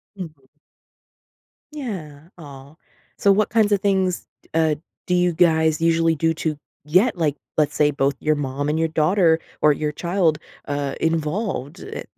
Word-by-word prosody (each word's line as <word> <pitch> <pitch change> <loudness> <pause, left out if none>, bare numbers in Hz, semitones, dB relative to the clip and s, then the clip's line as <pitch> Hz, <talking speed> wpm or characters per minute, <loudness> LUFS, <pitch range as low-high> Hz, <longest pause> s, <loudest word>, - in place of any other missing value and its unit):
Mhm. 160 -8 -9 1.3
Yeah, 170 - -7
aw. 140 -2 -12 0.4
So, 200 - +4
what 210 +1 +2
kinds 215 -2 +2
of 200 - +2
things, 190 -3 0 0.3
uh, 160 -1 +2 0.3
do 180 - +2
you 180 -1 +2
guys 160 -2 +3
usually 165 0 +3
do 165 +2 +1
to 155 -2 -2 0.3
get, 185 +8 +3
like, 150 -4 +1 0.2
let's 150 -2 +1
say, 150 -1 +3
both 140 0 0
your 155 0 +1
mom 145 +1 -3
and 155 - 0
your 165 - +2
daughter 160 +1 +3 0.2
or 150 - +6
your 150 +1 -2
child, 170 0 +1 0.3
uh, 145 -1 -2
involved, 160 - -2
eh 435 - -7
160 Hz, 155 wpm, -22 LUFS, 150-180 Hz, 1.3 s, or